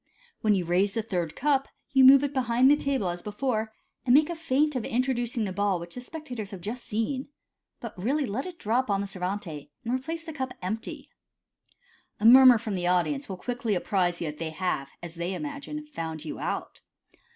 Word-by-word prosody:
When 215 -2 +3
you 180 -3 -1
raise 190 +5 +2
the 225 - 0
third 175 -7 -2
cup, 275 -1 +1 0.3
you 265 -1 +6
move 270 +1 +9
it 285 0 -1
behind 255 0 +4
the - - +7
table 275 -10 -1
as 175 0 -4
before, 220 +1 -2 0.3
and 250 -1 +5
make 305 +3 +5
a - - -3
feint 300 -2 +1
of 250 - -1
introducing 245 -2 0
the 190 - -4
ball 200 -2 +1
which 170 0 -9
the 250 - -6
spectators 250 -7 -7
have 195 -4 -8
just 230 +7 -5
seen, 255 +6 -2 0.5
but 235 - -7
really 280 +8 +1
let 245 - -3
it 360 -2 -8
drop 240 +1 0
on 200 -1 +1
the - - -2
servante, 180 -6 -4 0.2
and 235 - -1
replace 320 +6 -3
the 325 -1 -7
cup 260 -3 -4
empty. 215 +5 -5 1.1
A 210 - -2
murmur 255 +1 +9
from 220 -1 -4
the 175 -2 -1
audience 205 +11 +1
will 190 - -4
quickly 235 0 -2
apprise 180 -1 0
you 160 -3 -2
that 150 - -16
they 165 -1 -3
have, 155 -4 -2
as 170 -1 -7
they 170 +2 -3
imagine, 295 +2 -6
found 160 - -6
you - - -5
out. - - -4
225 Hz, 205 wpm, -27 LUFS, 185-270 Hz, 1.1 s, move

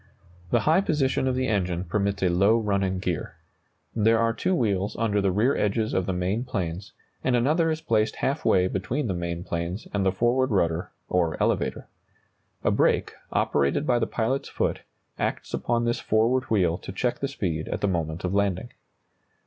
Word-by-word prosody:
The - - +2
high 160 +5 +4
position 135 -7 +1
of 130 - +1
the 130 0 0
engine 90 -6 0
permits 100 +2 -1
a 90 - +4
low 100 +6 +4
running 100 -4 0
gear. 90 -3 -3 0.6
There 115 +1 +4
are 115 0 +2
two 185 +9 0
wheels 100 - 0
under 105 -3 +1
the 100 -1 +2
rear 110 +9 +2
edges 110 +2 0
of 95 -1 0
the - - +1
main 95 +6 -1
planes, 95 -6 -4 0.3
and 130 - +2
another 155 +7 +2
is 160 0 -2
placed 110 -4 +1
half 140 +3 -1
way 90 -1 +4
between 115 +10 -2
the 100 - -1
main 85 -1 -3
planes 85 +4 -4
and 100 -1 +1
the 95 - +3
forward 120 +6 +2
rudder, 85 -5 0 0.2
or 85 -3 +1
elevator. - - 0 0.8
A - - +3
brake, - - +2 0.2
operated 70 - +1
by 120 -4 +2
the - - 0
pilot's 130 +5 -1
foot, - - -1 0.4
acts - - -2
upon 120 0 0
this 120 0 0
forward 120 +4 +2
wheel 90 -8 +1
to - - -8
check 120 +6 -1
the 140 - -1
speed 85 - -3
at - - -3
the 100 - +2
moment 80 -3 -2
of 90 0 -1
landing. 100 +2 0
105 Hz, 185 wpm, -26 LUFS, 90-120 Hz, 0.8 s, high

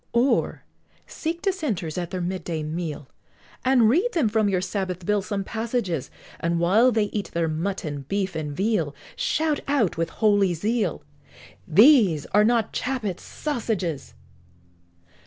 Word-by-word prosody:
Or, 240 +4 +1 0.4
seek 335 +2 -4
Dissenters 280 - -2
at 175 -2 -3
their 185 -1 -4
mid 185 +1 -3
day 160 -3 -3
meal, 155 -2 -4 0.6
And 255 -3 +4
read 360 - +2
them 295 -11 +2
from 215 -1 +2
your 185 -2 +1
Sabbath 185 -1 -3
Bill 210 +1 +2
some 195 +1 -3
passages, 220 - -2 0.3
And 170 0 0
while 210 +9 +4
they 220 -2 +2
eat 205 -2 -3
their 170 -1 +1
mutton, 155 -3 -3
beef, 195 -3 -1
and 155 -2 -3
veal, 190 -8 0 0.2
Shout 310 -2 0
out 270 - +1
with 165 0 -1
holy 205 -4 +2
zeal, 210 -1 -1 0.6
"These 200 - +6
are 210 +1 +6
not 230 -1 +2
Chappet's 240 -8 -2
sassages!" 215 - -3
200 Hz, 140 wpm, -24 LUFS, 170-235 Hz, 0.6 s, These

